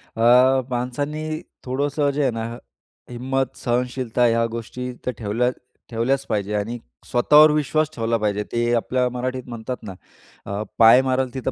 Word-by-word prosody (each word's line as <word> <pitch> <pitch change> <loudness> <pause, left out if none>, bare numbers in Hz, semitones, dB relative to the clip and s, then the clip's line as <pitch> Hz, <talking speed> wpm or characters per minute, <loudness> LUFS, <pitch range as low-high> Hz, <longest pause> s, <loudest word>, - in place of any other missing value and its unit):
अ, 125 +3 +5
माणसांनी 145 +6 -3 0.3
थोडंसं 145 +3 0
जे 145 +2 -1
आहे 135 -3 +2
ना, 115 -1 -4 0.7
हिंमत 130 +2 -2
सहनशीलता 125 0 0
ह्या 115 0 +3
गोष्टी 125 +2 -5
तर 125 - 0
ठेवल्या 115 +3 0 0.4
ठेवल्याच 130 +4 0
पाहिजे 105 -2 -1
आणि 105 +4 -2 0.3
स्वतःवर 150 +5 +6
विश्वास 155 +1 +1
ठेवला 115 0 0
पाहिजे, 105 -1 -1
ते 120 0 0
आपल्या 125 +2 0
मराठीत 125 +1 -4
म्हणतात 120 +1 -5
ना, 100 -3 -7 0.5
अ, 100 +1 -3 0.2
पाय 115 +3 +8
मारेल 130 -1 -1
तिथं 130 0 -3
125 Hz, 145 wpm, -22 LUFS, 115-130 Hz, 0.7 s, पाय